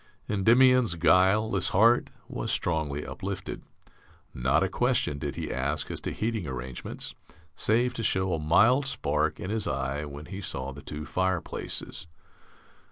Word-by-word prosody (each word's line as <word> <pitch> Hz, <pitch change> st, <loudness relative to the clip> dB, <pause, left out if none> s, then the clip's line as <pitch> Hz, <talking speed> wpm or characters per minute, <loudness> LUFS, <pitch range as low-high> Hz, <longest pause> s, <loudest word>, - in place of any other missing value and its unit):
Endymion's 120 Hz, +1 st, +4 dB
guileless 95 Hz, +4 st, +3 dB
heart 115 Hz, +5 st, +4 dB, 0.2 s
was -, -, -3 dB
strongly 75 Hz, -4 st, -1 dB
uplifted. -, -, -5 dB, 0.7 s
Not 60 Hz, +1 st, +2 dB
a -, -, +2 dB
question 70 Hz, -1 st, 0 dB
did -, -, -4 dB
he -, -, -4 dB
ask 70 Hz, +3 st, -2 dB
as -, -, -5 dB
to -, -, -3 dB
heating 110 Hz, -6 st, -2 dB
arrangements, 65 Hz, -1 st, -6 dB, 0.4 s
save 120 Hz, +7 st, +2 dB
to 115 Hz, -, -4 dB
show 95 Hz, -3 st, +1 dB
a 80 Hz, -, -1 dB
mild 120 Hz, -, +4 dB
spark 75 Hz, -, 0 dB
in 95 Hz, -, -4 dB
his 110 Hz, -1 st, -1 dB
eye 70 Hz, +2 st, -2 dB
when 70 Hz, +1 st, -8 dB
he 100 Hz, +3 st, -7 dB
saw 65 Hz, -7 st, -3 dB
the 70 Hz, +2 st, -10 dB
two 75 Hz, +1 st, -6 dB
fireplaces. 90 Hz, 0 st, -3 dB
85 Hz, 145 wpm, -28 LUFS, 75-110 Hz, 0.7 s, Endymion's